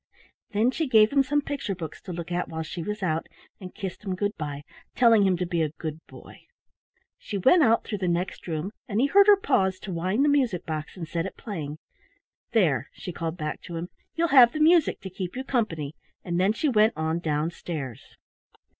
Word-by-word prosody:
Then 220 +4 +2
she 320 +3 -2
gave 220 -4 +5
him 280 - +5
some 290 +2 0
picture 275 -9 -3
books 160 -3 -7
to - - -8
look 170 0 -6
at 175 0 -1
while 160 0 -4
she 170 +2 -6
was 210 +4 -4
out, 160 -2 -1 0.3
and 185 -2 -10
kissed 195 -1 -6
him 190 -3 -2
good 205 +3 -1
bye, 145 -2 -5 0.3
telling 225 -5 +5
him 185 -2 +2
to 180 - -1
be 170 -1 -1
a 155 - +1
good 155 -1 -5
boy. - - -14 0.7
She 205 - -5
went 295 - +5
out 230 -5 +4
through 210 - -4
the 185 - -1
next 175 +2 -2
room, 165 +3 -3 0.2
and 210 +1 -1
he 260 - +4
heard 400 +7 +5
her 410 -1 +8
pause 190 - +1
to 195 - -6
wind 185 +10 +1
the - - +4
music 255 -11 +1
box 155 +2 -5
and 165 -3 -6
set 165 +1 -2
it - - -10
playing. 155 -9 -6 0.7
"There," 150 - +2
she 180 - -7
called 165 +1 -4
back 155 -2 -4
to 170 - -8
him, 170 +2 -4 0.3
"you'll 335 0 +1
have 250 -4 +7
the 310 - -3
music 320 +1 +4
to 190 - -7
keep 185 +1 -5
you 260 - -3
company," 170 - -2 0.3
and 175 0 -2
then 190 +3 +3
she 300 - -1
went 220 -4 +4
on 160 +1 -1
down 155 0 -1
stairs. 145 -9 -6
185 Hz, 215 wpm, -26 LUFS, 165-235 Hz, 0.7 s, her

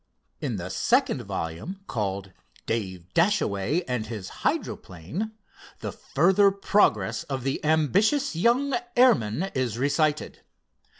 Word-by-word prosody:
In - - -2
the - - -5
second - - +2
volume, 85 - -5
called 100 - -3 0.3
"Dave 95 -5 -4
Dashaway 165 - +1
And 125 -4 -2
His 105 -5 -6
Hydroplane," 105 - -3 0.5
the - - -3
further 190 +6 +3
progress 120 - +2
of 135 -3 -4
the 135 +1 -2
ambitious 180 - +2
young 240 - +2 0.2
airman 195 - +3
is 125 -4 -1
recited. 150 +3 0
140 Hz, 110 wpm, -26 LUFS, -, 0.5 s, further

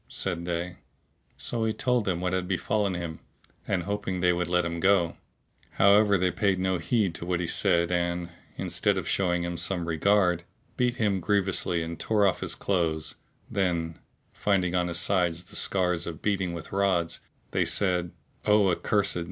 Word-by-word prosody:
said 85 0 -3
they: 85 +1 -3 0.6
so 115 -1 -2
he 110 - +1
told 125 0 0
them 90 -3 0
what 90 0 -1
had 90 -1 -1
befallen 100 +1 0
him, 85 -2 -5 0.5
hoping 95 0 -2
they 90 0 +3
would 90 0 -1
let 90 0 +2
him 85 0 -3
go; 90 -2 +3 0.6
however 100 +1 +5
they 90 0 +1
paid 100 -2 +1
no 95 -1 0
heed 95 +2 +1
to 85 - -7
what 90 0 -1
he 90 - -1
said 85 +1 +2
and, 85 0 -1 0.3
instead - - 0
of - - -3
showing 90 -2 0
some 85 -1 -1
regard, 90 +1 +2 0.3
beat 125 -1 +1
him 105 -5 +1
grievously 95 -3 0
and 80 0 -6
tore 105 -2 +2
off 95 - +2
his - - -3
clothes: 80 -5 -1 0.3
then, 85 -4 -1 0.3
finding 95 -3 +1
on 90 -1 +1
his 85 -1 -3
sides 90 -2 +1
the 90 - -12
scars 90 -3 +1
of 80 -1 -6
beating 95 -4 0
with 85 -1 -7
rods, 95 -4 +1 0.3
they - - +2
said, 90 -3 0 0.4
"O 105 -2 +5
accursed! 100 +2 +1
90 Hz, 170 wpm, -27 LUFS, 85-100 Hz, 0.6 s, however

